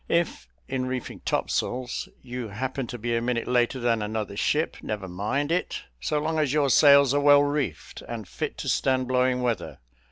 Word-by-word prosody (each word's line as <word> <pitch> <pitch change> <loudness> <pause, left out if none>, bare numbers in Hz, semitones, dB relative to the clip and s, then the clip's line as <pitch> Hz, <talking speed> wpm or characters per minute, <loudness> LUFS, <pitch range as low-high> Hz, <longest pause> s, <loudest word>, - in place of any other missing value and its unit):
If, 170 - 0 0.2
in 130 -1 -2
reefing 130 -1 -4
topsails, 125 0 -1
you 125 -2 -5
happen 130 +5 -4
to 120 - -6
be 120 +1 -1
a 115 - +1
minute 120 -1 -1
later 125 +1 +2
than 115 -2 +1
another 105 -1 -3
ship, 150 +9 0
never 105 -3 -4
mind 105 - -2
it, 180 - -1 0.2
so 110 - -1
long 160 +2 0
as 150 -4 +1
your 145 -3 +3
sails 140 0 +7
are 145 - +2
well 145 0 +7
reefed, 145 -1 -3
and 115 -4 -6
fit - - -4
to - - -5
stand 130 -1 +1
blowing 125 0 +2
weather. 90 - -2
125 Hz, 185 wpm, -26 LUFS, 115-140 Hz, 0.2 s, sails